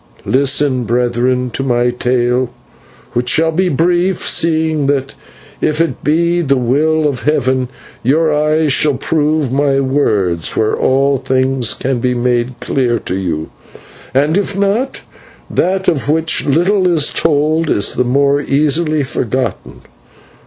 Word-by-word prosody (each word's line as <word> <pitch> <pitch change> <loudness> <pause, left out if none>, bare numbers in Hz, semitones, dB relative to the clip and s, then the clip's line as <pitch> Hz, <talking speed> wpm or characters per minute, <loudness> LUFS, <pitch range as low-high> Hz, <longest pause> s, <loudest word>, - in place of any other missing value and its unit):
Listen, 135 -1 +1
brethren, 125 +2 0
to - - -4
my 120 -2 +1
tale, 125 0 0 0.6
which 120 +1 0
shall 160 +3 +2
be 180 +3 0
brief, 175 +4 +1
seeing 160 -3 +1
that 135 -1 -1 0.5
if 155 +1 0
it 165 0 -1
be 170 +3 +1
the 140 -4 +1
will 150 +5 +1
of 135 -5 -3
Heaven, 130 -4 0 0.3
your 155 +5 +2
eyes 150 -1 +1
shall 145 +1 +3
prove 150 0 0
my 140 0 +1
words 105 - 0
where 110 - +1
all 135 +1 +1
things 130 -2 0
can 130 -1 -2
be 125 +1 0
made 120 0 -1
clear 125 -3 0
to 90 - -5
you, 80 -5 -3 0.6
and 145 +6 +1
if 200 -1 -3
not, 205 +7 -1 0.5
that 190 +1 0
of 145 -3 0
which 160 +1 +1
little 180 +6 +2
is 165 -4 +1
told 155 +1 +1
is 100 - +1
the - - 0
more 140 +3 +1
easily 150 +2 +1
forgotten. 130 -1 -4
140 Hz, 140 wpm, -14 LUFS, 125-160 Hz, 0.6 s, shall